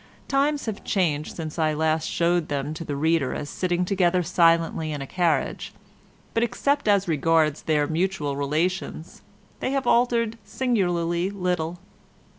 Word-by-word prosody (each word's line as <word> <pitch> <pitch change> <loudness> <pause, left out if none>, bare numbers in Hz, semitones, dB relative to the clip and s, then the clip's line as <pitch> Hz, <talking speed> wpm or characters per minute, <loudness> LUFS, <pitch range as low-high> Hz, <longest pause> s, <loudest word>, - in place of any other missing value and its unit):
Times 280 +1 +1
have 220 -3 -5
changed 155 -6 0
since 160 -1 -6
I 155 -1 +2
last 160 +1 +1
showed 170 -1 +1
them 145 +1 -2
to 155 - -6
the 145 -3 -4
reader 160 -2 +1
as 145 - -5
sitting 180 -1 0
together 180 -2 +2
silently 165 -2 +2
in 145 - -4
a 140 - -5
carriage, 170 +2 -1 0.6
but 230 - +1
except 280 +3 0
as 200 -2 +3
regards 160 -1 +2
their 150 -2 +1
mutual 160 -2 -1
relations, 155 +4 -2 0.4
they - - -1
have 270 -2 0
altered 235 -2 +2
singularly 180 -6 0
little. 180 -4 -2
170 Hz, 145 wpm, -24 LUFS, 155-195 Hz, 0.6 s, as